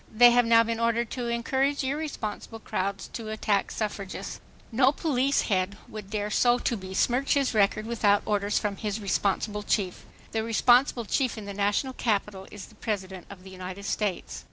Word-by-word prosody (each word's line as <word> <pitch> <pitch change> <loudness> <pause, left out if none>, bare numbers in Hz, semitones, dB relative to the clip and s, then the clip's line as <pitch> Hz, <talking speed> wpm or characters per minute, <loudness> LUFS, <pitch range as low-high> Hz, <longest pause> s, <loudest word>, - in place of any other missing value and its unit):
They 240 +2 +7
have 245 -1 +4
now 230 0 +6
been 230 0 -2
ordered 230 0 +1
to 245 -2 -3
encourage 265 +4 0
irresponsible 265 -6 -4
crowds 195 -2 -3
to 225 -2 -6
attack 210 -2 0
suffragists. 205 -3 -5 0.3
No 255 +3 +4
police 280 -2 +1
head 195 0 0
would 210 -2 -9
dare 210 0 -2
so 240 +2 +4
to 240 - -1
besmirch 225 +8 0
his 275 -3 +1
record 215 0 +2
without 210 -3 +2
orders 205 -1 0
from 205 -2 -1
his 210 0 -3
responsible 205 +1 -1
chief. 195 -3 -1 0.3
The 220 -1 -1
responsible 240 +2 +3
chief 255 +2 0
in 215 - -7
the 200 - -6
National 205 +6 0
Capital 205 -5 -2
is 205 -2 -9
the - - -18
President 190 -4 -4
of 190 -2 -11
the 190 - -11
United 185 +1 -7
States." 190 - -2
215 Hz, 175 wpm, -27 LUFS, 200-240 Hz, 0.3 s, They